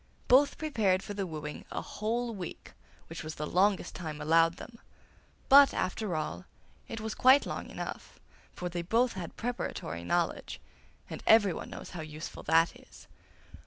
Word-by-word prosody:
Both 275 +3 +5
prepared 215 -12 +1
for 205 - -6
the 195 -2 -3
wooing 150 -2 -6
a - - -3
whole 230 +2 -2
week, 185 -5 -8 0.3
which 165 0 -8
was 155 0 -6
the 150 - -4
longest 190 +4 +1
time 155 -4 -6
allowed 165 +2 +3
them; 230 -1 -11 0.7
but, 280 0 +8
after 185 0 -2
all, 155 +4 -4 0.4
it 225 - -6
was 220 0 -4
quite 265 +2 +6
long - - -5
enough, - - -7 0.3
for 180 - -5
they 175 0 -3
both 230 +8 +2
had 180 -3 -7
preparatory 225 - -4
knowledge, 175 - -1 0.5
and - - -7
everyone 205 -5 +4
knows - - -9
how 175 - -6
useful 155 0 -7
that 165 +2 +3
is. - - -17
185 Hz, 160 wpm, -30 LUFS, 165-225 Hz, 0.7 s, but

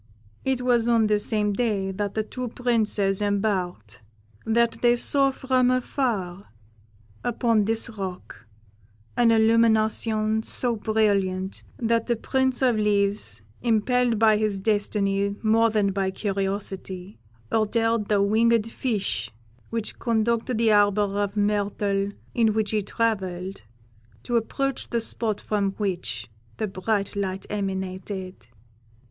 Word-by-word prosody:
"It 260 -2 0
was 240 -2 +2
on 230 -2 +4
the 210 -1 +2
same 210 -1 0
day 200 -4 0
that 200 +1 -3
the 220 - 0
two 250 +3 -5
princes 220 -5 0
embarked 195 - -1 0.5
that 235 +1 +2
they 240 0 +5
saw 275 +3 +2
from 260 -1 +1
afar, 230 -8 -1 0.7
upon 230 -3 +1
this 225 +1 0
rock, 190 - -7 0.7
an 240 -1 +4
illumination 220 -1 +3
so 240 +1 0
brilliant, 200 -3 0 0.2
that 230 -1 0
the 240 - +2
Prince 260 +2 0
of 245 -3 +3
Leaves, 200 - +2 0.2
impelled 240 +1 +2
by 215 -1 +5
his 210 -2 0
destiny 200 -1 0
more 225 +1 +4
than 210 -2 +1
by 195 -1 -1
curiosity, 195 - -4 0.3
ordered 225 0 +1
the 205 -2 +3
winged 225 +2 +3
fish 200 - -2 0.4
which 225 -2 -4
conducted 230 +1 0
the 225 -1 +3
arbour 205 -1 +3
of 205 0 -3
myrtle 205 -1 0 0.2
in 225 -2 +3
which 215 -2 0
he 215 -1 +1
travelled, 195 -4 -2 0.6
to 240 - -2
approach 270 +4 -1
the 235 - 0
spot 225 -2 -2
from 200 -2 -1
which 180 - -3 0.3
the 215 - -1
bright 200 +1 -2
light 195 -1 -3
emanated. 190 - -4
215 Hz, 125 wpm, -25 LUFS, 195-230 Hz, 0.7 s, they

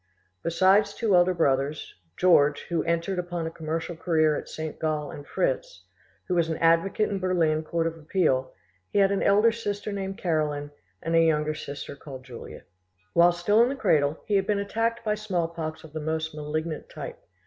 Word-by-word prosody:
Besides 190 +5 +3
two 215 -5 +2
elder 180 +1 +4
brothers, 140 -2 0 0.2
George, 150 -5 +4
who 170 -1 0
entered 170 +3 0
upon 175 -2 -3
a 160 - -3
commercial 165 +1 -4
career 160 -2 +2
at - - -6
St, 155 -1 -6
Gall, 155 -2 -1
and 145 - -10
Fritz, - - -2 0.4
who 180 - -1
was 170 -2 +2
an 160 - -1
advocate 165 +6 +3
in 200 - -1
the - - -4
Berlin 170 -4 +1
court 165 +1 -1
of 165 0 -2
appeal, 150 -5 +1 0.4
he - - -2
had 195 -1 +5
an 200 - 0
elder 210 +3 +5
sister 210 -2 -4
named 195 -1 -4
Caroline, 150 -4 -1 0.3
and 165 +1 0
a 165 - +6
younger 155 -1 +2
sister 145 -2 -7
called 135 -3 -10
Julia. 125 -3 -10 0.5
While 170 +1 +6
still 175 +6 +3
in 240 - +4
the 275 - -2
cradle 155 - +2
he 205 - +2
had 195 0 0
been 210 -1 +2
attacked 225 +3 -1
by 210 - +2
smallpox 170 -6 -3
of 155 -2 -13
the 155 - -3
most 160 +1 -2
malignant 155 +1 -4
type. - - -8
165 Hz, 190 wpm, -26 LUFS, 155-195 Hz, 0.5 s, a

